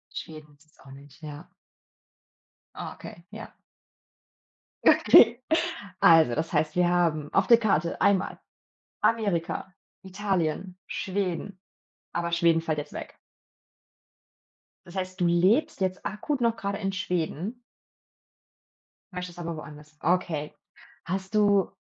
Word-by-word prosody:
Schweden 155 -2 -9
ist 145 +2 -26
es 155 - -31
auch 135 - -15
nicht, 140 +3 -15
ja. 155 +3 -9 1.3
Okay, 170 - -9
ja. 220 +2 -9 1.3
Okay. 235 +2 +7 0.6
Also, 160 -7 +6
das 160 +2 -2
heißt, 155 - +1
wir 180 -1 +3
haben 165 -4 0
auf - - +3
der 235 - +8
Karte 170 -7 0
einmal 200 -1 +2 0.6
Amerika, 190 -5 0 0.3
Italien, 190 -2 -2
Schweden, 190 0 -3 0.5
aber 170 0 -2
Schweden 170 -1 +3
fällt 160 -2 -2
jetzt 150 - -5
weg. - - -8 1.7
Das 175 - -13
heißt, 185 0 -4
du 175 - +4
lebst 205 - +2
jetzt 185 0 -2
akut 250 +7 -3
noch 230 -1 +2
grade 200 -1 -3
in 195 -2 -2
Schweden? 185 - -3 1.5
Möchtest 180 -1 -6
aber 170 -1 -4
woanders. 150 0 -11
Okay. 165 -3 0 0.5
Hast 190 +4 -4
du 205 -3 +3
180 Hz, 115 wpm, -27 LUFS, 160-200 Hz, 1.7 s, der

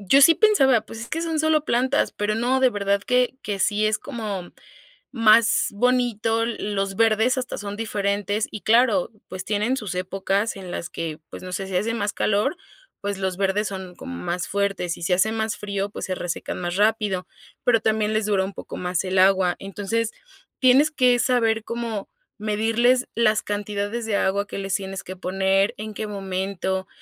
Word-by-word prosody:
yo 275 - +8
sí 330 +4 +8
pensaba, 270 - +4
pues, 225 +1 -10
es 235 - -7
que 325 - -2
son 325 -2 -1
solo 310 -1 +2
plantas, 255 -2 +1
pero 210 +1 -1
no, 250 +4 +1
de 260 - +6
verdad 200 -1 0
que 250 +1 +1
que 200 -2 -3
sí 210 +2 +2
es 215 0 +1
como 205 -7 -5 0.6
más 230 -1 +5
bonito, 230 -1 +1
l 235 0 -2
los 195 -1 -2
verdes 225 +3 +3
hasta 250 -1 -3
son 205 -1 -5
diferentes 205 -1 -1
y, 215 - -6
claro, 245 +4 +3 0.2
pues, 185 0 -6
tienen 215 +5 0
sus 200 -6 -4
épocas 195 +3 -1
en 190 -2 -8
las 175 0 -5
que, 160 -3 -5
pues, - - -9
no 185 - -7
sé, 195 +1 -3
si 190 - -5
hace 225 +4 0
más 210 -2 -1
calor, 215 - +1 0.4
pues, 200 -1 -3
los 190 -1 -2
verdes 200 +2 0
son 190 -2 -7
como 85 - -8
más 175 - -3
fuertes 195 -3 -1
y - - -12
si 180 - +2
hace 190 +5 +3
más 220 -1 -1
frío, 200 -1 -3
pues, - - -6
se 185 -2 -3
resecan 175 0 -4
más 175 0 -3
rápido, 205 -3 +1 0.4
pero 235 -2 +4
también 215 -1 +1
les 215 0 +1
dura 200 -2 +2
un 195 - -5
poco - - -8
más 180 -1 -1
el 185 +1 -1
agua. 185 -1 +4
Entonces, 205 +3 -2 0.5
tienes 270 +4 +5
que 250 -4 +4
saber 230 -3 +2
cómo 230 -3 -4 0.3
medirles 225 +4 +2
las 220 -2 +2
cantidades 205 +2 -3
de 210 - 0
agua 200 +1 +1
que - - -6
les 195 -1 -3
tienes 195 -1 -3
que 185 - -7
poner, 190 +2 +1
en 215 0 -6
qué 215 +1 -4
momento. 190 -1 -3
210 Hz, 190 wpm, -23 LUFS, 195-230 Hz, 0.6 s, yo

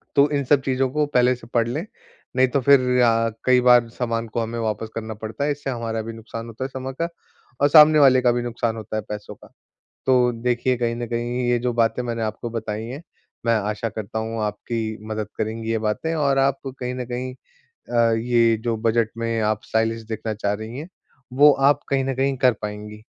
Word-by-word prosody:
तो 140 +1 +5
इन 140 - 0
सब 140 +1 +3
चीज़ों 130 0 0
को 150 +2 +1
पहले 125 -3 +3
से 120 -2 -14
पढ़ 115 -1 +2
लें, 145 +9 -3 0.5
नहीं 130 0 +4
तो 135 +3 0
फिर 125 -2 +4
आ 115 -1 +3 0.2
कई 125 -1 +5
बार 120 -1 +5
सामान 115 -1 -3
को 110 +2 -3
हमें 115 +1 -4
वापस 110 0 -2
करना 110 -1 -4
पड़ता 110 +6 -4
है, 145 - +1
इससे 145 -1 -4
हमारा 115 -3 -3
भी 115 +1 -7
नुकसान 115 +1 -8
होता 115 +2 -6
है - - -2
समय 130 0 -6
का, 170 - +1 0.5
और 145 - +6
सामने 155 0 +8
वाले 130 -3 +6
का 125 -1 +4
भी 120 0 -1
नुकसान 120 -1 -2
होता 110 0 -6
है 110 - 0
पैसों 105 -1 -6
का। - - -17 0.6
तो 125 -2 +4
देखिए, 125 +1 +1
कहीं 115 -1 -1
न 120 0 -4
कहीं 120 +2 -2
ये 120 0 +2
जो 125 0 -1
बातें 115 +1 +1
मैंने 115 -1 -3
आपको 110 +2 -4
बताईं 110 -1 -4
हैं, 140 +4 -7 0.4
मैं 115 0 +3
आशा 105 +2 -2
करता 110 0 -5
हूँ, 110 0 -3
आपकी 110 +1 -3
मदद 110 -1 -3
करेंगी 110 +1 -3
ये 115 - +1
बातें 160 +10 -1
और 140 -3 +1
आप 135 0 +2 0.2
कहीं 125 0 -3
न 125 -1 -4
कहीं 125 +1 -4 0.6
अ, 115 -1 +3
ये 115 0 +3
जो 115 -2 0
बजट 115 0 +1
में 115 0 -1
आप 110 0 0
स्टाइलिश 115 0 0
देखना 110 0 -4
चाह 100 -1 -1
रही 110 +4 -7
हैं, 155 +4 -7 0.4
वो 145 +3 +7 0.2
आप 145 0 +1
कहीं 135 -1 +1
न 135 0 -1
कहीं 135 +1 +1
कर 130 -1 +4
पाएँगी। 105 0 -7
120 Hz, 220 wpm, -22 LUFS, 110-130 Hz, 0.6 s, सामने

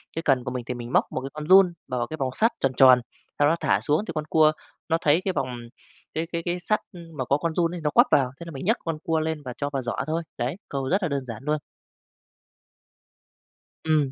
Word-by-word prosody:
cái 165 - -2
cần 130 -3 +3
của 125 - -4
mình 125 -1 -4
thì 125 - -3
mình 120 +1 -7
móc - - +4
một 130 - -3
cái 135 - -5
con 150 0 -6
giun 185 -1 +7
bào 125 - -3
vào 120 - -1
cái 155 - -6
vòng 135 -2 -1
sắt 225 +2 +3
tròn 135 - +1
tròn, 130 -2 +8 0.4
sau 145 - +5
đó 160 - +3
thả - - +2
xuống 155 +8 +1
thì - - -3
con 155 -1 -2
cua 155 -1 +5 0.4
nó 165 - +3
thấy 155 +4 +3
cái 190 - 0
vòng 135 - -1 0.7
cái 160 +1 -2
cái 170 - -2
cái 175 0 -1
sắt 215 +5 +1 0.3
mà 130 -3 -3
có 140 +3 +2
con 165 +1 -2
giun 170 0 +1
ấy 170 - -6
nó 150 - +1
quắp - - +5
vào, 130 -3 +3
thế 170 - -8
là 170 - -8
mình 135 0 -7
nhấc 225 +5 +3
con 165 -2 -2
cua 165 -1 +1
lên 155 -1 -3
và 125 - -5
cho 145 - -2
vào 135 -2 -2
giỏ 120 -1 -3
thôi. 165 +2 -1
Đấy, 125 +6 -2
câu 135 -1 -3
rất 195 +1 +1
là 175 - 0
đơn 140 -2 -2
giản 115 0 -7
luôn. 150 +1 +1 2.3
Ừm. 155 -4 +2
150 Hz, 260 wpm, -25 LUFS, 130-165 Hz, 2.3 s, tròn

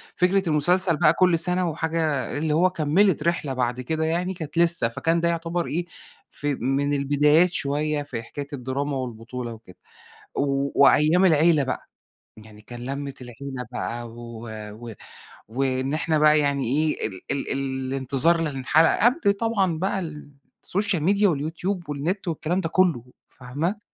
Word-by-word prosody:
فكرة 180 0 +2
المسلسل 170 +3 +3
بقى 155 0 +5
كل 175 -2 +3
سنة 180 +1 +1
وحاجة 160 -3 -1
اللي 155 0 0
هو 180 +4 +4
كمّلت 170 0 +2
رحلة 165 -5 -1
بعد 125 0 -1
كده 160 +5 -2
يعني، 175 +3 -1
كانت 160 -3 -8
لسه، 170 -7 +4
فكان 165 +8 0
ده 170 - +2
يعتبر 170 +1 -2
إيه، 170 +3 -2 0.4
ف 145 - -9
من 140 +1 0
البدايات 150 +5 +3
شوية 145 +1 -1
في 115 -5 -6
حكاية 140 +4 -7
الدراما 135 +2 -3
والبطولة 120 -1 -6
وكده. 110 -5 -15 0.6
و 140 0 0
وأيام 155 +6 +5
العيلة 160 -2 +4
بقى، 130 - -4 0.5
يعني 110 -1 -14
كان 120 +2 -10
لمة 140 +2 -4
العيلة 125 +1 -7
بقى 120 0 -4
و 120 0 -9 0.2
و 115 +1 -9 0.5
وإن 130 +3 -1
إحنا 155 0 0
بقى 150 0 +5
يعني 140 -3 0
إيه، 155 -5 0
ال 95 -4 -10
ال 140 - -2
ال 130 -1 -3
الانتظار 135 +5 +2
للحلقة 155 - +2
قبل 240 -5 +3
طبعًا 200 -6 0
بقى 195 +1 -1
ال 150 -4 -8 0.3
السوشيال 195 -4 -1
ميديا 200 +3 +3
واليوتيوب 165 +4 -3
والنت 165 +8 -3
والكلام 170 +2 -1
ده 165 - -3
كله، 170 -10 +2 0.3
فاهمة؟ 150 - -4
150 Hz, 155 wpm, -24 LUFS, 135-170 Hz, 0.6 s, بقى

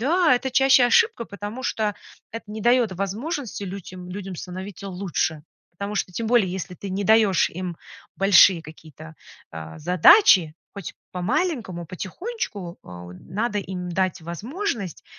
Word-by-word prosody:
Да, 320 +2 +4
это 265 +2 -2
чаще 265 -1 +5
ошибка, 430 - +3
потому 205 +5 -7
что 215 -4 -1 0.4
это 230 - -6
не 215 +1 -6
даёт 240 -3 +3
возможности 210 - -4
людям 185 -1 -8
людям 190 -1 -6
становиться 190 +3 -7
лучше. 170 -5 -2 0.3
Потому 200 +4 -5
что 180 - -2
тем 225 +4 -3
более, 235 -6 +4
если 185 -1 -5
ты 200 - -8
не 195 +2 -2
даёшь 215 -3 +4
им 175 -1 -5 0.4
большие 190 -3 +6
какие-то, 160 0 -13 0.4
э, 80 0 -8
задачи, 180 - +6 0.2
хоть 200 -5 -7 0.2
по-маленькому, 220 - -2
потихонечку, 195 - -6
а, 90 0 -10
у 90 - -10
надо 210 - -3
им 180 -2 -5
дать 185 0 -1
возможность, 220 - -4
195 Hz, 140 wpm, -23 LUFS, 180-235 Hz, 0.4 s, большие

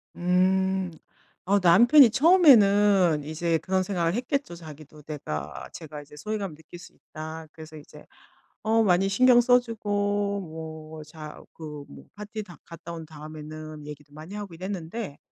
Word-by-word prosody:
음. 185 +1 +1 0.5
어 200 +2 +3
남편이 235 - +7
처음에는 205 - +5
이제 160 +2 -1
그런 190 0 0
생각을 175 -3 -1
했겠죠. 255 - -2
자기도 155 -2 -13
내가 75 - -6
제가 155 -3 -9
이제 145 +1 -16
'소외감을 200 -1 -4
느낄 160 +2 -13
수 175 - -14
있다.' 160 0 -9
그래서 160 -1 -12
이제 145 - -14 0.6
어 225 +1 +2
많이 190 0 +2
신경 245 +3 +5
써주고 205 -4 0
뭐 160 -1 -9
자 155 -1 -11
그 150 -3 -9
뭐 - - -13
파티 210 +1 -7
다 175 -4 -14
갔다 170 0 -10
온 165 -1 -8
다음에는 155 0 -10
얘기도 145 -1 -11
많이 160 +7 -10
하고 205 -4 -7
이랬는데 185 -1 -6
175 Hz, 295 characters per minute, -26 LUFS, 155-205 Hz, 0.6 s, 남편이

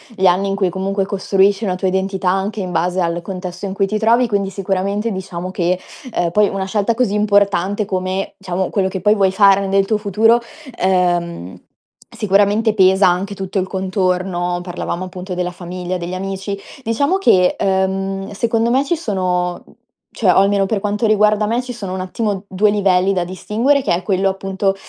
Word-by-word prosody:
gli 190 -1 +3
anni 185 +2 +2
in 195 - -1
cui 195 -2 +1
comunque 195 +2 -2
costruisci 195 +1 +1
una 185 -2 0
tua 185 +1 -1
identità 190 0 -1
anche 195 +3 -1
in 185 -1 -4
base 180 +2 0
al 170 0 -1
contesto 180 0 -6
in 190 - -4
cui 195 0 0
ti 215 +2 -1
trovi, 230 +3 +3
quindi 200 -3 -1
sicuramente 200 +3 -2
diciamo 185 -2 -5
che 180 -1 0 0.4
ehm, 175 - 0
poi 210 +3 +4
una 195 -1 -3
scelta 205 +3 0
così 225 -3 0
importante 205 -1 +2
come, 185 0 -3
diciamo, 185 -1 -2
quello 195 -2 0
che 190 0 -4
poi 210 0 +4
vuoi 195 -2 +2
fare 195 -1 +4
nel 195 0 +2
tuo 215 +2 +1
futuro, 220 +3 +3 0.4
ehm, 175 - 0 0.6
sicuramente 205 +2 +2
pesa 190 -1 +5
anche 185 +3 0
tutto 190 0 -5
il 185 - -1
contorno: 185 -2 -1
parlavamo, 175 0 -4
appunto, 185 0 -7
della 180 0 -2
famiglia, 180 +1 -5
degli 175 +1 -5
amici. 195 +1 -4 0.3
Diciamo 280 +10 +1
che, 185 - +3
ehm, 195 0 -1
secondo 225 +2 0
me 260 +3 +3
ci 345 - 0
sono 180 - -2 0.5
cioè, 195 -5 +2
o - - +2
almeno 195 0 +3
per 205 +1 -1
quanto 205 +2 -1
riguarda 210 0 +3
me, 230 +3 0
ci 250 0 -7
sono 200 -6 -6
un 190 - -4
attimo 200 +1 -3
2 200 +2 +2
livelli 195 -2 +2
da 180 -3 0
distinguere, 225 +10 0
che 255 - 0
è 175 - 0
quello, 195 +1 +1
appunto, 195 0 -1
195 Hz, 185 wpm, -18 LUFS, 185-205 Hz, 0.6 s, pesa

